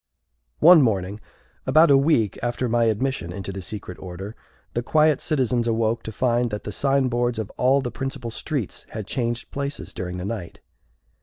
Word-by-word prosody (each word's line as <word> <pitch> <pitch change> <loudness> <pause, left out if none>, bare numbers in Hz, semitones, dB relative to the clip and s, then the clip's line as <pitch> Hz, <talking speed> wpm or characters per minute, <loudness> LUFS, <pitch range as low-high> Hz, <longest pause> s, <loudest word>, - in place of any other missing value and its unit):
One 170 0 +9
morning, 100 -4 0 0.5
about 155 -1 +6
a - - +8
week 135 - +2
after 120 +1 -1
my 120 0 +2
admission 110 -4 -1
into 100 +2 -5
the 95 0 -6
secret 95 -2 -7
order, 95 +4 -7 0.4
the 120 - 0
quiet 155 +4 +3
citizens 125 -5 +1
awoke 115 0 +1
to 110 - -7
find 120 +1 +1
that 105 -1 -5
the 105 - -5
signboards 125 -3 +1
of 110 -2 -4
all 135 +2 +2
the 125 -2 -4
principal 135 -3 -5
streets 135 - -4
had 110 -2 -6
changed 120 +2 -2
places 140 0 -4
during 90 0 -5
the 90 - -5
night. 100 -5 -5
120 Hz, 170 wpm, -24 LUFS, 105-135 Hz, 0.5 s, One